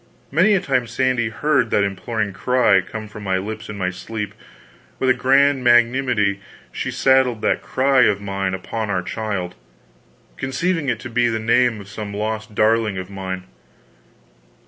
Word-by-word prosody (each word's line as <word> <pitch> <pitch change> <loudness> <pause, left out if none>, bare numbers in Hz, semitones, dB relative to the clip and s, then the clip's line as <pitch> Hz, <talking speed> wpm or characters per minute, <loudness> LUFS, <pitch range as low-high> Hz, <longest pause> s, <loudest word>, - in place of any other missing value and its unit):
Many 185 +8 +4
a - - +3
time 130 -6 0
Sandy 120 -1 0
heard 140 0 +1
that 105 - +2
imploring 100 +1 -2
cry 125 -1 +3
come 110 +3 -7
from 105 0 -10
my 95 -2 0
lips 105 +4 -6
in 105 - -6
my 90 -1 -1
sleep. 105 +2 -6 0.6
With 130 -1 +2
a - - +5
grand 135 +2 +3
magnanimity 120 -4 +3 0.3
she - - -4
saddled 130 -4 +2
that - - +1
cry 130 -1 +3
of 100 -1 +2
mine 95 -1 -2
upon 110 +3 -4
our 90 -3 -1
child, 100 -4 -3 0.8
conceiving 150 +3 -1
it 120 -3 -1
to 120 - -7
be 120 +1 +2
the 115 -1 0
name 115 +1 +2
of 100 - -11
some 100 0 -7
lost 110 +1 -4
darling 110 -2 +2
of 95 +1 -6
mine. 95 -1 -5
110 Hz, 165 wpm, -21 LUFS, 100-130 Hz, 0.8 s, a